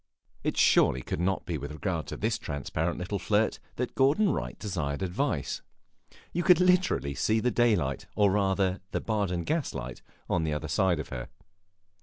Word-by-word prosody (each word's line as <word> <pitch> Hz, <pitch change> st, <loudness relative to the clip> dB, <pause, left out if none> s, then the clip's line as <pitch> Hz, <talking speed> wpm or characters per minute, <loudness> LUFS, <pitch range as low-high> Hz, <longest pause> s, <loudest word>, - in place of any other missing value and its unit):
It -, -, -1 dB
surely 65 Hz, +1 st, +4 dB
could -, -, -3 dB
not 95 Hz, +2 st, 0 dB
be 85 Hz, -4 st, -3 dB
with 70 Hz, +2 st, -6 dB
regard 75 Hz, -2 st, -3 dB
to -, -, -5 dB
this -, -, 0 dB
transparent 80 Hz, +4 st, -2 dB
little 95 Hz, +3 st, -3 dB
flirt 105 Hz, +3 st, +1 dB, 0.2 s
that 125 Hz, 0 st, -3 dB
Gordon 150 Hz, +10 st, +3 dB
Wright -, -, -3 dB
desired 85 Hz, -6 st, -3 dB
advice; 95 Hz, -, -1 dB, 0.7 s
you 175 Hz, -, 0 dB
could 180 Hz, -1 st, +6 dB
literally 180 Hz, -, +3 dB
see 110 Hz, +9 st, +1 dB
the 125 Hz, +2 st, +1 dB
daylight 100 Hz, -, +1 dB
or 100 Hz, -2 st, +4 dB
rather 95 Hz, -1 st, +1 dB
the -, -, -1 dB
Baden 100 Hz, -6 st, -1 dB
gaslight 70 Hz, -, -3 dB, 0.3 s
on 85 Hz, -, +1 dB
the 75 Hz, -1 st, 0 dB
other 80 Hz, +1 st, -4 dB
side 90 Hz, +2 st, +2 dB
of 75 Hz, -, -5 dB
her. -, -, -6 dB
95 Hz, 170 wpm, -28 LUFS, 75-115 Hz, 0.7 s, could